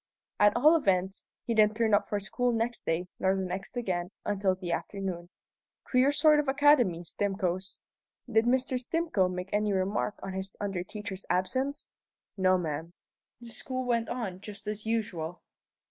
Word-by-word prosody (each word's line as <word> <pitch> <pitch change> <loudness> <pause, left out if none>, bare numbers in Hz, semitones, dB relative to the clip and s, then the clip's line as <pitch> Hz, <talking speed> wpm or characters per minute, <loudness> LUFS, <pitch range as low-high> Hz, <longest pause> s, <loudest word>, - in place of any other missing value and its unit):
"At 205 0 +5
all 300 +7 +6
events, 190 - +1 0.2
he 235 - 0
didn't 215 -1 +4
turn 225 -2 +2
up 205 - +4
for 205 - -1
school 245 +5 0
next 230 +1 -2
day, 165 +2 0
nor 190 0 +2
the 190 - -1
next 190 +5 -4
again, 180 -7 -1 0.2
until 195 -2 +1
the 185 -2 -5
afternoon. 180 -1 -3 0.5
Queer 255 +2 +3
sort 300 +1 +5
of 295 - 0
academy, 270 - +4
Stimcoe's. 190 0 -2 0.5
Did 220 -1 +3
Mr. 255 +1 +2
Stimcoe 255 - +1
make 180 +1 -5
any 210 0 +2
remark 195 +2 0
on 195 - -4
his 190 0 -5
under 195 -3 -2
teacher's 205 -1 -7
absence?" 260 +11 -1 0.4
"No, 185 -1 +4
ma'am." 165 0 -4 0.5
"The 235 - -8
school 255 +2 -4
went 235 -2 0
on 215 -7 -3
just 205 -1 -9
as 210 +1 -4
usual?" 185 -7 -2
205 Hz, 160 wpm, -29 LUFS, 185-240 Hz, 0.5 s, all